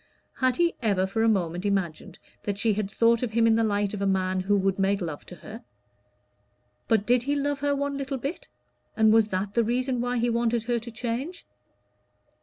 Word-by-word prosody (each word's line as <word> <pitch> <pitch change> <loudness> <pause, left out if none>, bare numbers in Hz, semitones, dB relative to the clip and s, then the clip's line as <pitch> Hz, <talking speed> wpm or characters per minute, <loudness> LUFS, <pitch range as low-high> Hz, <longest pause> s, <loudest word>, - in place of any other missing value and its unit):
Had 255 -2 +1
he 345 0 +2
ever 200 -5 +1
for 200 +4 -2
a 225 - +4
moment 175 -4 0
imagined 195 -6 -2 0.2
that 200 -1 -3
she 215 +1 +2
had 205 -1 -2
thought 230 +2 +3
of 240 -4 -3
him 230 0 +3
in 225 - +5
the 225 0 +2
light 205 -1 0
of 205 - -4
a 200 - +1
man 185 -1 +1
who 200 +2 +2
would 195 0 0
make 195 +1 +2
love 160 -6 -6
to 180 - -9
her? 215 +8 -11 1.2
But 220 -3 +2
did 245 +1 +3
he 285 +4 -1
love 285 0 -1
her 285 0 +1
one 280 0 -2
little 275 0 -3
bit, 275 - -5 0.5
and 220 -1 +5
was 225 -1 +5
that 195 0 -3
the 235 - +3
reason 250 +2 0
why 245 0 -1
he 235 +1 +1
wanted 235 -1 +1
her 240 0 0
to 235 +1 -9
change? 245 +9 -4
225 Hz, 210 wpm, -26 LUFS, 200-245 Hz, 1.2 s, in